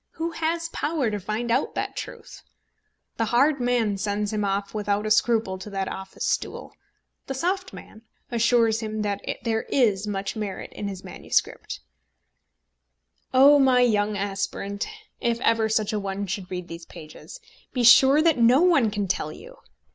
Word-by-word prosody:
Who 330 +1 -3
has 330 +1 -2
power 295 -8 -1
to 210 - -2
find 215 +5 -3
out 255 +4 0
that - - -3
truth? - - -8 0.8
The 225 - +1
hard 275 +6 +3
man 240 -5 0
sends 205 +1 -2
him 210 -1 -1
off 200 0 -2
without 205 -1 -1
a 215 - -2
scruple 215 -3 +2
to 190 - -8
that 195 -1 -3
office 190 0 -6
stool; - - -3 0.5
the 270 - -4
soft 370 +7 -1
man 220 - -12 0.3
assures 230 -1 +3
him 215 -1 -3
that 205 -1 -2 0.2
there 225 -1 0
is 210 -6 +2
much 195 0 -3
merit 210 -3 -5
in 205 - -5
his 195 -2 -7
MS. - - 0 1.9
Oh, 280 +3 +7
my 260 -2 +4
young 210 -3 +2
aspirant, 200 0 -3 0.3
if 235 -2 0
ever 225 -2 +2
such 215 0 0
a 210 - 0
one 200 0 -3
should 190 -1 -5
read 180 -1 -5
these 165 -1 -9
pages, 165 - -12 0.3
be 250 - -1
sure 265 +5 +7
that 325 -6 +3
no 245 +7 +5
one 325 -11 +4
can 205 -1 -2
tell 185 - -2
you! - - -13
220 Hz, 165 wpm, -25 LUFS, 200-250 Hz, 1.9 s, Oh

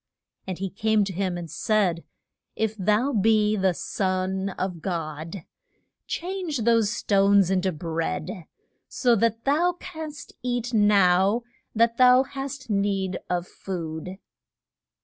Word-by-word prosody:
And 185 -2 -4
he 195 -1 -4
came 215 +1 +2
to 195 -1 -4
him 185 -1 -1
and 175 -1 -6
said, 180 -1 0 0.5
If 220 -1 -1
thou 215 +7 +1
be 215 0 +3
the 190 -3 +1
Son 190 +1 -1
of 180 -3 -3
God 165 0 -4 0.6
change 350 - -3
those 230 -2 +3
stones 200 -3 +3
in 190 -1 +2
to 190 0 0
bread, 165 +3 -4 0.4
so 245 -2 +2
that 230 +1 +1
thou 325 +6 +3
canst 315 -5 -8
eat 245 -1 -2
now 200 0 +4 0.3
that 230 +1 +3
thou 255 0 +6
hast 275 0 -6
need 200 -3 0
of 175 0 -1
food. 175 0 -6
200 Hz, 130 wpm, -25 LUFS, 185-230 Hz, 0.6 s, thou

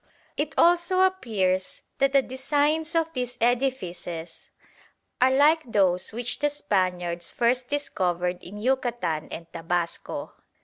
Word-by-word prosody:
It 295 +1 -3
also 350 +2 +4
appears 215 - 0 0.2
that 275 0 +3
the 275 -1 +4
designs 295 +5 0
of 325 0 +1
these 250 -1 -3
edifices 190 -9 -2 0.7
are 255 - +6
like 295 +5 +5
those 185 -4 +3
which 240 +2 -3
the 295 - +2
Spaniards 180 -10 -1
first 245 +1 0
discovered 180 -11 -1
in 200 +4 -10
Yucatan 235 -10 -1
and 165 - -7
Tabasco." 170 0 -3
245 Hz, 120 wpm, -26 LUFS, 180-290 Hz, 0.7 s, are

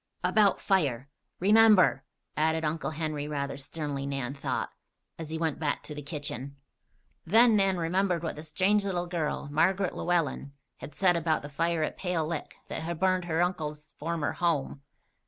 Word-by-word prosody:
"About 210 -3 +3
fire. 140 - 0 0.3
Remember!" 205 -7 +5 0.3
added 160 +1 +1
Uncle 155 +1 -1
Henry, 155 -2 -3
rather 140 -2 -3
sternly, 140 -1 -4
Nan 135 -2 -3
thought, 140 - -3 0.5
as 160 -2 -6
he 160 - -3
went 160 -2 -1
back 150 -2 -1
to 150 - -6
the 150 - -6
kitchen. 145 -2 -5 0.7
Then 225 +5 +5
Nan 195 -2 +2
remembered 175 +1 0
what 165 - -3
the 150 - -7
strange 190 +7 +1
little 180 -3 -1
girl, 170 -5 -2
Margaret 185 +5 +2
Llewellen, 155 -5 -1 0.2
had 150 - -10
said 180 -2 +3
about 160 -2 0
the 145 - -7
fire 165 +2 0
at - - -3
Pale 180 -4 -1
Lick 160 -1 -5
that - - -5
had 165 0 -4
burned 185 -1 +2
her 165 0 +1
uncle's 155 -4 -4
former 165 -1 -1
home. 155 -5 -1
160 Hz, 165 wpm, -29 LUFS, 150-180 Hz, 0.7 s, Remember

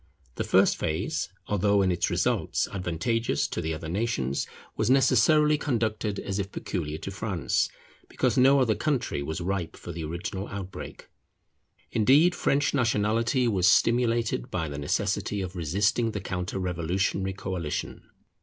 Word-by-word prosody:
The - - -3
first - - +4
phase, 80 0 -2 0.2
although 100 0 +2
in 95 - +2
its 85 -1 0
results - - 0
advantageous 100 +6 -1
to - - -3
the 80 - -2
other 80 +1 -7
nations, 85 - -1 0.3
was - - 0
necessarily 145 +4 +4
conducted 110 -6 -1
as 100 0 -3
if 100 0 -3
peculiar 80 -5 -4
to 95 - -6
France, 100 -3 -1 0.4
because - - 0
no 135 +1 +6
other 120 -4 +3
country 130 - -1
was 80 +4 -4
ripe 90 -1 -2
for 85 - -8
the 85 -1 -5
original 85 +5 -4
outbreak. 95 -1 -8 0.8
Indeed 140 - +5
French 140 -3 +1
nationality 115 0 +1
was 95 -5 +3
stimulated 115 +1 +2
by 85 -8 -2
the 70 -1 -5
necessity 100 +6 -1
of 95 -1 -5
resisting 100 +7 +1
the 105 - -2
counter 90 -1 -4
revolutionary 95 +2 -1
coalition. 90 -5 -4
100 Hz, 145 wpm, -27 LUFS, 90-115 Hz, 0.8 s, no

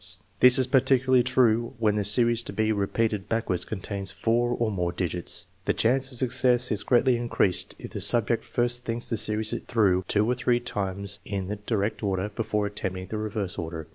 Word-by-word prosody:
This 125 +1 +8
is 130 - +3
particularly 130 0 +3
true 120 -1 +1
when 110 -2 +1
the 105 0 -1
series 115 +3 +3
to - - -6
be 110 0 0
repeated 105 0 -1
backwards 115 -6 -1
contains 100 -1 -4
four 115 +5 0
or 120 -2 -1
more 90 -3 -1
digits. 90 -1 -3 0.2
The - - +1
chance 135 +4 +1
of 125 - -1
success 125 0 +2
is 105 -2 +1
greatly 125 +3 +3
increased 115 -6 0
if - - -10
the - - -5
sub 120 -2 +3
ject 115 - 0
first 120 0 -1
thinks 120 +1 -4
the 115 - 0
series 110 +1 0
through 95 -6 +2
two 105 +1 +2
or 125 - +2
three 125 -1 +1
times 100 -4 -3
in 95 -2 -4
the 105 - -3
direct 105 0 -2
order 100 -1 -1
before 105 0 -2
attempting 95 -2 -5
the 110 - -3
reverse 105 -3 -3
order. 80 -1 -5
110 Hz, 195 wpm, -26 LUFS, 100-120 Hz, 0.2 s, This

